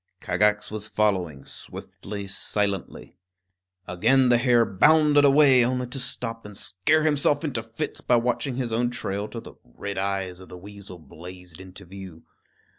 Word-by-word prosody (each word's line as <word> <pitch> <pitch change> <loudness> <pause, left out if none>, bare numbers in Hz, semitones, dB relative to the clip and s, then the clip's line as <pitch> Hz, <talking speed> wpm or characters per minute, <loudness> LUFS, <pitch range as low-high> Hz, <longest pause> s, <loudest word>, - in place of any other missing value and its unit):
Kagax 105 +3 +1
was 110 0 -5
following, 90 -11 -1
swiftly, 100 0 -8
silently. 100 0 -3 0.7
Again 120 +9 +3
the 120 -1 +4
hare 120 -2 +4
bounded 150 +8 +4
away, 140 -3 +6
only 125 +1 -1
to 125 +2 -7
stop 115 -2 -5
and 105 -1 -11
scare 145 +13 +1
himself 145 0 +2
into 135 -7 -2
fits 110 0 -6
by 125 - +2
watching 125 +2 0
his 120 -3 -3
own 120 +2 +1
trail 100 -3 -4
till 115 - -8
the - - -12
red 100 +11 -6
eyes 95 -2 -2
of 95 - -13
the 90 - -10
weasel 100 0 -11
blazed 90 +2 -12
into 95 +1 -12
view. 95 -3 -11
105 Hz, 155 wpm, -25 LUFS, 95-125 Hz, 0.7 s, away